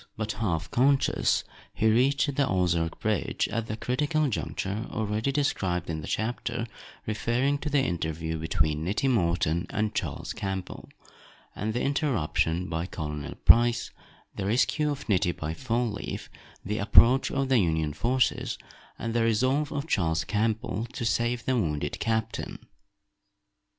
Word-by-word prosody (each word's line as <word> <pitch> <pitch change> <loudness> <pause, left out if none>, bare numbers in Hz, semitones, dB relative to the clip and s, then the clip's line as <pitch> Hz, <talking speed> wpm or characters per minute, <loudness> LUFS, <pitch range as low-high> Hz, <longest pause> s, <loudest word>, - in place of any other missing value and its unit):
But 110 0 -2
half 95 -6 -2
conscious, 135 +2 +3 0.3
he - - 0
reached 140 +6 +3
the 140 -1 +2
Ozark 85 -3 0
bridge 110 -3 0
at 115 +1 -2
the 110 - -4
critical 150 +5 0
juncture 105 -1 -3
already 110 +4 -1
described 95 - 0
in 80 -1 -3
the - - -7
chapter 120 +1 -2 0.4
referring 120 +6 0
to 150 - -3
the 145 -2 +3
interview 80 - -2
between 80 -1 0
Nettie 100 +10 0
Morton 85 -7 +1
and 105 0 -1
Charles - - -3
Campbell, 95 -2 -5 0.7
and 110 +2 -2
the 125 - 0
interruption 90 - 0
by 85 0 -2
Colonel 75 -5 -5
Price, 120 0 +5 0.4
the 95 - -3
rescue 135 +7 +2
of 140 -1 -4
Nettie 90 -4 +2
by 80 0 -4
Fall 120 +2 -1
leaf, 100 - -6 0.3
the 105 +2 -2
approach 120 +6 +5
of 135 -1 -1
the 130 -3 +5
Union 80 -5 +1
forces, 125 - 0 0.4
and 115 0 -3
the 120 - +2
resolve 130 +6 +2
of 145 +1 -2
Charles 85 - +1
Campbell 110 +2 -1
to 115 - -3
save 120 +1 0
the 130 - +2
wounded 75 - -1
captain. 110 -1 -2
110 Hz, 145 wpm, -27 LUFS, 85-125 Hz, 0.7 s, Price